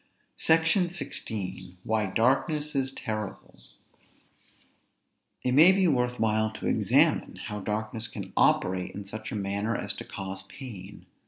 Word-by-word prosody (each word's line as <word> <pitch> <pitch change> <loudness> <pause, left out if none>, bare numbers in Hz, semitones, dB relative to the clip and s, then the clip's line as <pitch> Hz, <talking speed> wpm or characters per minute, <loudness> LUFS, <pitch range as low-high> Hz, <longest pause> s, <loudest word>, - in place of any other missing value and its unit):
SECTION 165 +3 +3
XVI. 95 - -5
WHY 110 -1 0
DARKNESS 140 - +1
IS 135 -1 0
TERRIBLE. 110 -5 -5 1.8
It 125 - +1
may 155 +8 +8
be 190 -1 +3
worth 125 -4 +1
while 110 0 +2
to - - -7
examine - - +3
how 105 0 -5
darkness 110 +2 -3
can - - -8
operate 90 0 +2
in 100 0 -6
such 110 +2 -7
a - - -3
manner 100 +3 -1
as - - -3
to - - -6
cause 95 0 -6
pain. 100 -2 -10
110 Hz, 135 wpm, -28 LUFS, 100-135 Hz, 1.8 s, may